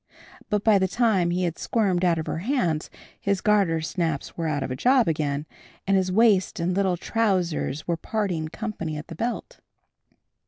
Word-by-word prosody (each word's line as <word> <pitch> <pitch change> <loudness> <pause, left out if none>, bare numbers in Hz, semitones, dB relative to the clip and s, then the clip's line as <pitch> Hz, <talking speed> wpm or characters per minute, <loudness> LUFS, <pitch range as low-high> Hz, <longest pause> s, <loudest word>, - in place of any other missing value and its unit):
But 210 -1 0
by 215 -3 +5
the 190 - +2
time 195 -4 +2
he 180 +1 0
had 170 -2 -2
squirmed 195 -6 +1
out 175 -2 +3
of 160 - -3
her - - -3
hands 180 - 0 0.3
his 200 -1 0
gartersnaps 165 -6 0
were 165 -1 -2
out 145 -3 -1
of - - -4
a - - -2
job 250 - +3
again, 150 -2 -1 0.4
and 195 - +2
his 185 -1 +1
waist 205 -3 +3
and 175 +2 0
little 190 -2 +1
trousers 180 -9 -1
were 170 -1 0
parting 180 -5 -2
company 165 -5 -5
at 150 - -8
the 165 - -7
belt. 240 - -4
180 Hz, 175 wpm, -25 LUFS, 165-210 Hz, 0.4 s, by